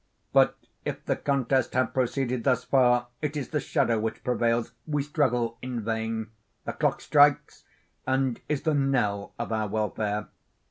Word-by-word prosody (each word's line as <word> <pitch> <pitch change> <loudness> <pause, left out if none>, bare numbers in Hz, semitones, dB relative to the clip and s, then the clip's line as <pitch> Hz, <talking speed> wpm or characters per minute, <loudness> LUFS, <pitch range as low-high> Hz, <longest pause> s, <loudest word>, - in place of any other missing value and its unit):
But, - - +4 0.3
if - - -5
the - - +1
contest 135 -3 0
have 130 0 +1
proceeded 130 -1 0
thus 130 -2 +2
far, 125 -2 +3
it 150 0 -2
is 140 - -4
the 150 - 0
shadow 130 -9 +1
which 110 +1 -3
prevails,—we 120 +3 -1
struggle 125 -6 0
in 125 -2 -4
vain. 110 0 -2 0.3
The - - -3
clock - - 0
strikes, 145 -1 +3 0.4
and 130 -2 0
is 150 -2 -1
the 155 - +2
knell 125 -8 0
of 120 -1 -4
our 110 -1 0
welfare. 105 0 -2
125 Hz, 150 wpm, -27 LUFS, 115-135 Hz, 0.4 s, But